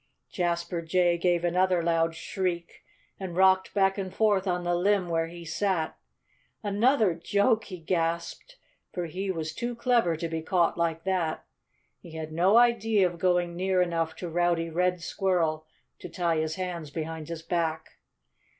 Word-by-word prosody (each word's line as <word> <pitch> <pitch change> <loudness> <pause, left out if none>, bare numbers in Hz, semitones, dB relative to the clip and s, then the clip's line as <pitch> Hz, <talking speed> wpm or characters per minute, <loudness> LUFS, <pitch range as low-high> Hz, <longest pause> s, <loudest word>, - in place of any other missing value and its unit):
Jasper 170 -1 -1
Jay 175 +1 +2
gave 175 -1 +1
another 180 0 +2
loud 165 -1 +1
shriek 170 0 -4 0.4
and 185 -3 -5
rocked 190 0 +4
back 195 0 +2
and 190 -1 -4
forth 205 -1 +2
on 180 -1 0
the 175 0 0
limb 185 +1 +2
where 165 -1 0
he 170 0 -10
sat. 175 -1 -1 0.7
"Another 215 0 +3
joke!" 205 +7 +1
he 185 - -7
gasped 170 - -2 0.3
for 175 -1 -3
he 185 +4 -4
was 160 -4 -3
too 240 0 -4
clever 235 -8 +2
to 165 - -3
be 165 0 -3
caught 170 +1 +1
like 165 -1 -1
that. 180 -4 -1 0.5
He 165 - -13
had 160 -1 -6
no 180 +7 +4
idea 225 -4 +4
of 175 -1 -3
going 175 -1 +1
near 185 +1 +1
enough 165 -2 0
to 180 - -6
Rowdy 170 0 0
Red 180 +1 0
Squirrel 165 -5 0 0.3
to - - -8
tie 170 -2 0
his 155 0 -1
hands 175 -4 -4
behind 160 0 -5
his 165 -1 -6
back. 165 -2 -2
175 Hz, 160 wpm, -27 LUFS, 165-190 Hz, 0.7 s, rocked